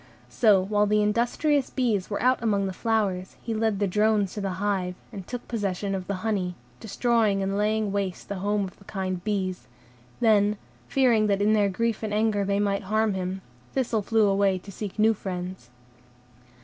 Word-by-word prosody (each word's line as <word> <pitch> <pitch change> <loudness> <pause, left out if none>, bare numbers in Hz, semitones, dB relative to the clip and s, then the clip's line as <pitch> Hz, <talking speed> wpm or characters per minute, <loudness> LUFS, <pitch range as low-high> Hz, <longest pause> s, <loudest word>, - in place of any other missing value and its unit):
So 210 -5 +4
while 205 +1 +1
the 210 0 +3
industrious 245 +7 +1
bees 225 -8 0
were 205 - -2
out 255 0 +3
among 205 -4 +1
the 190 - -3
flowers, 200 -4 -1
he 230 - -4
led 220 -2 0
the 205 - +1
drones 210 0 +2
to 210 - -4
the 195 -2 -2
hive, 190 -3 -1 0.2
and 195 -3 -8
took 245 -1 -6
possession 200 -3 -2
of 185 -1 -4
the 200 +1 -4
honey, 190 -5 -1 0.2
destroying 220 -2 +1
and 195 +1 -1
laying 210 0 +1
waste 195 -3 -3
the 200 -2 -4
home 205 +1 0
of 190 - -7
the 200 - -18
kind 185 -3 -3
bees; 190 -3 -2 0.5
then, 210 -2 +3 0.3
fearing 240 -5 +3
that 200 -1 +1
in 210 +1 +3
their 205 -2 +3
grief 230 +3 -1
and 215 -1 -2
anger 215 -1 +2
they 200 0 0
might 200 -1 0
harm 215 +1 +1
him, 190 0 -3 0.3
Thistle 245 -5 0
flew 220 +1 +2
away 195 -1 +2
to 200 +2 -10
seek 205 0 -6
new 220 +1 +4
friends. 180 - -6
205 Hz, 190 wpm, -26 LUFS, 195-220 Hz, 0.5 s, So